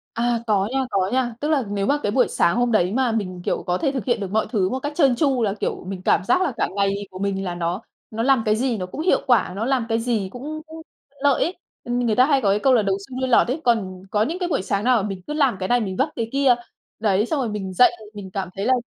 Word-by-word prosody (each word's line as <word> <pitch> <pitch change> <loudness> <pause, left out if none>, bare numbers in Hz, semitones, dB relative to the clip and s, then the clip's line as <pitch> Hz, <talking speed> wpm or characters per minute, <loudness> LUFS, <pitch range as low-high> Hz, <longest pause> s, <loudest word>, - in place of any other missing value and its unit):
À, 235 0 +1
có 205 -2 +2
nha, 270 - +1
có 190 -1 +1
nha. 250 -2 0
Tức 295 - -1
là 300 -4 +2
nếu 200 -1 -1
mà 285 +5 +2
cái 205 - 0
buổi 250 +1 +3
sáng 170 - +2
hôm 245 0 +1
đấy 185 -3 +2
mà 250 0 +1
mình, 185 -5 -3
kiểu, - - -1
có 180 0 0
thể 270 - 0
thực 260 -7 -3
hiện 240 -1 0
được 195 -2 -4
mọi 220 +2 +1
thứ 195 -6 +1
một 260 - -2
cách 290 +2 -3
trơn 275 -7 +4
tru 265 -2 +1
là, 200 -3 +1
kiểu, - - -3
mình 185 -1 -6
cảm 185 - +2
giác 360 - +2
là 335 -7 0
cả - - 0
ngày 200 0 +2 0.2
của 185 - -9
mình 195 0 -2
là 175 -2 -3
nó 175 +4 -2 0.3
nó 225 +1 -3
làm 265 -1 +3
cái 215 0 +3
gì 245 0 0
nó 185 - -3
cũng 185 - -7
hiệu 350 +3 +2
quả, 245 -8 +3
nó 215 - -2
làm 255 -2 0
cái 225 -1 +1
gì 225 -5 -1
cũng 305 +5 -6
cũng 320 +1 -10 0.4
lợi 285 -3 +3
ấy. 350 - -3 0.3
Người 240 -2 0
ta 255 - +6
hay 280 -2 +3
có 200 - +3
cái 200 - +3
câu 260 +4 +3
là 230 - +4
đầu 195 -1 0
xuôi 255 -1 -7
đuôi 260 - 0
lọt 250 - +5
ấy, 280 +5 -2
còn 190 -6 0
có 210 - +2
những 320 +10 -2
cái 360 -2 -2
buổi 280 - 0
sáng 200 +1 -1
nào 250 0 +4
là 215 - +1
mình 195 -2 -5
cứ - - -4
làm 280 -7 +2
cái 185 - -2
này 245 0 +3
mình 190 -4 -3
vấp 265 +4 +1
cái 230 -1 -2
kia. 275 -2 +4 0.5
Đấy, 210 0 +2
xong 295 +2 -1
rồi 250 - -1
mình 200 -3 -4
dậy, 245 +8 +5 0.2
mình 200 -2 -8
cảm 190 -1 -3
thấy 195 - -2
là 260 - +3
230 Hz, 300 wpm, -22 LUFS, 195-260 Hz, 0.5 s, ta